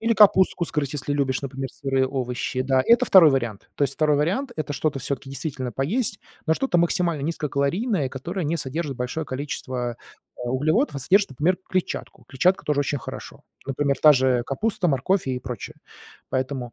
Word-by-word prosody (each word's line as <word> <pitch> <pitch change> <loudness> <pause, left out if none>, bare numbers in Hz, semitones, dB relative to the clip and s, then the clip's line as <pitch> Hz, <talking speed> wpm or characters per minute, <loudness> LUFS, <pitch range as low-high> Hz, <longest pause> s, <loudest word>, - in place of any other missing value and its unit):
или 230 +1 +2
капустку 190 -4 +5
сгрызть, 150 -4 -2
если 145 0 -2
любишь, 135 -2 0
например, 135 -1 -4
сырые 135 -1 0
овощи. 130 -1 -2
Да, 130 0 +2
это 235 0 +5
2 175 -5 +7
вариант. 120 -7 -2
То - - -2
есть 135 0 -2
2 150 -2 +2
вариант- 195 - 0
это 145 -1 -3
что-то 145 -1 -1
всё-таки 135 0 -4
действительно 135 -3 -4
поесть, 200 - -1 0.3
но 160 - +3
что-то 200 -3 +1
максимально 170 -3 +1
низкокалорийное, 155 - -1
которое 170 +8 -4
не 165 +3 0
содержит 140 -1 -3
большое 125 +6 -3
количество, 130 -3 -4 0.4
э, 120 -1 -4
углеводов, 155 - +1
а - - -2
содержит, 195 +8 +3
например, 165 +8 +1
клетчатку. 185 -1 -3
Клетчатка 180 +8 +2
тоже 150 -1 +1
очень 145 0 -1
хорошо. - - -9 0.2
Например, 140 0 0
та 150 -1 +8
же 130 -2 +2
капуста, 200 +5 -1
морковь 155 +7 +1
и 130 -1 -1
прочее. 125 -4 -7 0.5
Поэтому, 130 -2 -2
140 Hz, 170 wpm, -24 LUFS, 130-170 Hz, 0.5 s, та